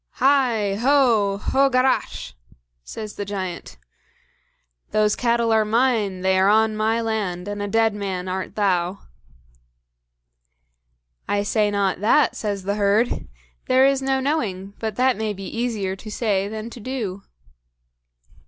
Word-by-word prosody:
"HI! 245 Hz, -7 st, +2 dB
HO!! 235 Hz, -7 st, +3 dB
HO 270 Hz, +6 st, +2 dB
GARACH!!!" 255 Hz, -, 0 dB, 0.5 s
says 215 Hz, -, -7 dB
the 205 Hz, -, -2 dB
giant. 190 Hz, -3 st, -6 dB, 1.1 s
"Those 210 Hz, -1 st, +2 dB
cattle 235 Hz, -1 st, +1 dB
are 220 Hz, -1 st, +4 dB
mine; 215 Hz, -4 st, +1 dB
they 190 Hz, 0 st, +2 dB
are 190 Hz, +1 st, +4 dB
on 220 Hz, +1 st, +3 dB
my 220 Hz, +2 st, +1 dB
land, 205 Hz, -5 st, -2 dB
and 205 Hz, 0 st, -4 dB
a 205 Hz, -, -2 dB
dead 225 Hz, +1 st, +2 dB
man 190 Hz, -3 st, -4 dB
art 185 Hz, 0 st, -4 dB
thou." 185 Hz, -2 st, 0 dB, 2.3 s
"I 205 Hz, 0 st, 0 dB
say 210 Hz, 0 st, +1 dB
not 200 Hz, -3 st, 0 dB
that," 235 Hz, +5 st, +3 dB
says 205 Hz, -3 st, -3 dB
the 200 Hz, +2 st, -2 dB
herd; 205 Hz, +4 st, +1 dB, 0.4 s
"there 260 Hz, +1 st, +5 dB
is 275 Hz, 0 st, +2 dB
no 265 Hz, 0 st, 0 dB
knowing, 205 Hz, -9 st, -2 dB
but 220 Hz, -2 st, -3 dB
that 255 Hz, 0 st, +2 dB
may 215 Hz, -1 st, -2 dB
be 195 Hz, 0 st, -8 dB
easier 215 Hz, -3 st, -2 dB
to 215 Hz, -, -10 dB
say 205 Hz, -3 st, 0 dB
than 220 Hz, +2 st, -6 dB
to 240 Hz, -, -10 dB
do." 215 Hz, -5 st, -4 dB
215 Hz, 140 wpm, -22 LUFS, 195-235 Hz, 2.3 s, there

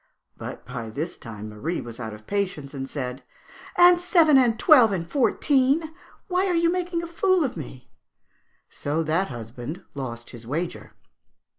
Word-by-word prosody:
"' -, -, -60 dB
But -, -, -8 dB
by 115 Hz, -2 st, -6 dB
this 150 Hz, +10 st, -5 dB
time 110 Hz, -2 st, -8 dB
Marie 140 Hz, +12 st, -3 dB
was 115 Hz, 0 st, -8 dB
out 110 Hz, -2 st, -5 dB
of 105 Hz, 0 st, -11 dB
patience, 180 Hz, -9 st, -2 dB
and 135 Hz, -1 st, -5 dB
said, 130 Hz, -2 st, -4 dB, 0.6 s
'And 350 Hz, 0 st, +7 dB
seven, 335 Hz, -4 st, +5 dB
and 245 Hz, -4 st, +4 dB
twelve, 250 Hz, -, +6 dB
and 170 Hz, -4 st, -2 dB
fourteen! 285 Hz, -, +2 dB, 0.3 s
Why, 370 Hz, 0 st, +1 dB
you 335 Hz, 0 st, +3 dB
are -, -, +2 dB
making 355 Hz, -1 st, -2 dB
a -, -, -4 dB
fool 370 Hz, +1 st, +2 dB
of 265 Hz, -, -2 dB
me!' 130 Hz, -5 st, -9 dB, 0.8 s
So 150 Hz, +3 st, -2 dB
that 165 Hz, +5 st, +1 dB
husband 120 Hz, -, -7 dB
lost 120 Hz, -4 st, -6 dB
his 115 Hz, -2 st, -11 dB
wager. 165 Hz, +6 st, -4 dB
170 Hz, 165 wpm, -25 LUFS, -, 0.8 s, And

